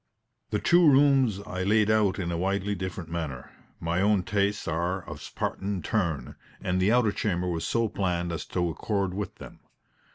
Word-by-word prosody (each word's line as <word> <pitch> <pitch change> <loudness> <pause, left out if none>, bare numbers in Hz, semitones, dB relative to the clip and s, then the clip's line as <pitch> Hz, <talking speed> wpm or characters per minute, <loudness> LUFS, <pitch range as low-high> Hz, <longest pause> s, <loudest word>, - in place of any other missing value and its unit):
The 105 - 0
two 170 +7 +5
rooms 135 -7 +4
I 90 - -4
laid 105 +2 +3
out 105 -3 +3
in 85 -3 -2
a 85 - -1
widely 100 +2 0
different 95 -3 -5
manner 80 -7 -4 0.3
my 85 +2 0
own 100 -2 +3
tastes 100 +1 0
are 85 +3 -1
of 75 - -6
a - - -15
Spartan 95 +4 -3
turn, 85 -10 -1 0.2
and 90 0 -1
the 95 +4 +3
outer 120 -3 +4
chamber 90 -4 -1
was 85 -2 -2
so 115 -1 +1
planned 90 -4 -1
as 85 - -3
to 90 -1 0
accord 95 +4 -1
with 100 -1 -4
them. - - -12
95 Hz, 185 wpm, -27 LUFS, 85-105 Hz, 0.3 s, two